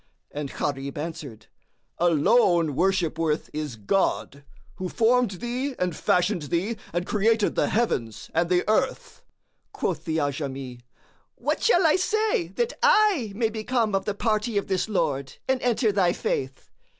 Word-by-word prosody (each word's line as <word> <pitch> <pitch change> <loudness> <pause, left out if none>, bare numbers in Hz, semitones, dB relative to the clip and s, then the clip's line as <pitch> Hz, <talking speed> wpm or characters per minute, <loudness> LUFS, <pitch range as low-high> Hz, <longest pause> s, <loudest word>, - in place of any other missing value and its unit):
and 145 -1 -4
Gharib 140 -1 -3
answered, 150 -7 -6 0.5
"Alone 170 - +3
worship 175 -2 +1
worth 155 -2 -1
is 150 -5 -4
God, 140 - -1 0.3
who 185 -1 -4
formed 240 +2 +3
thee 245 +6 -3
and 180 -3 -1
fashioned 180 +3 +1
thee 175 +9 -1 0.2
and 175 +1 -2
created 215 +1 +2
the - - +1
heavens 125 - -1
and 170 +1 +1
the 180 -1 +2
earth." 240 +5 -1 0.5
Quoth - - -3
the 160 -2 -1
Ajami, 135 -4 -3 0.6
"What - - -2
shall 365 -7 +4
I 320 - +5
say 430 +1 0
that 480 0 0
I 425 - +4
may 225 0 0
become 225 0 -1
of 195 0 0
the 205 - -2
party 215 0 0
of 200 - 0
this 190 +2 -1
Lord 140 -9 -1
and 265 -1 +1
enter 235 -2 +2
thy 185 -3 +2
Faith?" 130 0 -3
190 Hz, 150 wpm, -25 LUFS, 150-235 Hz, 0.6 s, I